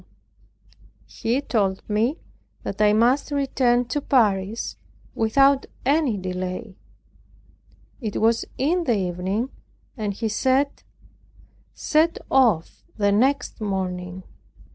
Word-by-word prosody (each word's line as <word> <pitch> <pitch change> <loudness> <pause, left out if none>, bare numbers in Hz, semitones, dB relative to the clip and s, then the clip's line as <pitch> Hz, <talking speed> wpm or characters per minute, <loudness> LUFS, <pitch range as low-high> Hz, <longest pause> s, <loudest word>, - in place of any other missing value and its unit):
He 240 +5 -2
told 195 -8 -1
me 225 +9 +1 0.5
that 200 - -4
I 210 0 +5
must 240 +7 +3
return 260 -4 +1
to 290 +4 -1
Paris 215 -5 +1 0.4
without 275 +5 +3 0.2
any 280 -5 +2
delay. 185 +2 -5 1.3
It 215 -4 -3
was 230 +1 +3
in 335 +6 +1
the 235 -6 +2
evening, 190 +6 -2 0.4
and 215 -4 -2
he 225 +2 -2
said, 260 +6 +1 0.9
"set 320 +2 +2
off 230 -12 +2 0.2
the 205 -1 +2
next 250 +3 +1
morning." 185 -2 -3
225 Hz, 100 wpm, -23 LUFS, 195-270 Hz, 1.3 s, I